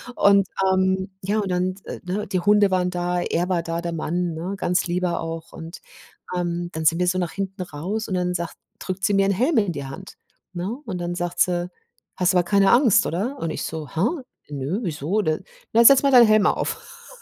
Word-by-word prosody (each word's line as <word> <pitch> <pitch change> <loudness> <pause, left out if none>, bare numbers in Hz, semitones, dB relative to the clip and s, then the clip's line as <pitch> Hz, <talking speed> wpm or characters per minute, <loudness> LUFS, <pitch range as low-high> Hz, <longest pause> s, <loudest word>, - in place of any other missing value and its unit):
Und, 200 -1 +4 0.3
ähm 190 +1 0
ja, 200 +3 -1
und 200 -2 -2
dann, 180 +1 0
äh, - - -7
ne, 195 +3 -3
die 185 -2 -1
Hunde 205 +1 +4
waren 180 -1 +1
da, 175 0 -1
er 175 0 -1
war 180 -2 0
da, 165 0 -3
der 170 0 -4
Mann, 170 +2 -2
ne, 165 +4 -5
'n - - -6
ganz 180 -1 0
lieber 175 0 -1
auch. 165 0 -6
Und, 165 +2 -9 0.5
ähm, 175 -1 -2
dann 160 - -4
sind 165 +1 +4
wir 180 - +1
so 185 +1 +1
nach 175 -2 -2
hinten 195 0 -5
raus 180 +6 -4
und 190 - -2
dann 180 0 0
sagt 170 -1 -4 0.2
drückt 190 0 -5
sie 200 - +2
mir 195 0 +3
'n - - +2
Helm 255 - +1
in 200 -4 0
die 140 -4 -5
Hand, 135 +9 -10 0.4
ne? 185 +6 -3
Und 190 -5 -4
dann 175 0 -3
sagt 175 0 -4
sie: 175 0 +1 0.5
„Hast 180 -1 +2
aber 180 -1 +3
keine 195 +2 +3
Angst, 240 -5 +5
oder?“ 220 - -2
Und 165 - -2
ich - - -4
so: 160 -2 -5
„Hä, 165 - -1 0.5
nö, 145 +7 -3
wieso 170 - -1
denn?“ 155 -1 -1 0.3
„Na, 230 +1 +6
setz 275 +2 +8
mal 280 - +2
deinen 245 -2 +8
Helm 215 -1 +4
auf.“ - - -4
180 Hz, 225 wpm, -23 LUFS, 170-200 Hz, 0.5 s, setz